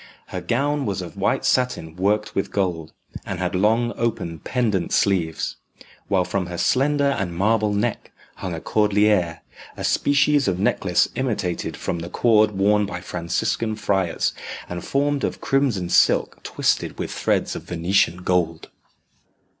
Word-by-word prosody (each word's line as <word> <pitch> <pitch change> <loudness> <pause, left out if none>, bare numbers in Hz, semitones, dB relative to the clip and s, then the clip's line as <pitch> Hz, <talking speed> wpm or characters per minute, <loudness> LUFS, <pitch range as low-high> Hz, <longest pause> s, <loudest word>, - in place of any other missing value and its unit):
Her - - -4
gown 140 +2 0
was 95 -2 -2
of 85 - -9
white - - 0
satin 125 -11 0
worked 105 +3 0
with 95 - -1
gold, 90 -5 -1 0.3
and 95 - -4
had 90 0 -2
long 110 +5 +2
open 95 -8 -2
pendent 110 -7 -1
sleeves, 85 -5 0 0.5
while 95 -2 +2
from 95 -2 -2
her 90 0 -6
slender 140 - +2
and 90 -3 -3
marble 105 +2 +2
neck 105 0 -2 0.3
hung 90 -2 -4
a - - -5
cordeliere 105 -4 +2 0.4
a - - -5
species 145 -1 +3
of 95 -2 +1
necklace 95 -2 +2
imitated 105 -9 -2
from 85 - -3
the 85 +1 -6
cord 110 0 +4
worn 100 +1 +2
by 90 -3 -5
Franciscan 90 +6 -2
friars, 95 -5 0 0.3
and 90 -1 -6
formed 140 0 0
of - - -2
crimson 130 -10 +1
silk - - +3
twisted - - -1
with - - -4
threads - - 0
of - - -5
Venetian 90 0 0
gold.. 85 -3 0
100 Hz, 145 wpm, -22 LUFS, 90-115 Hz, 0.5 s, cord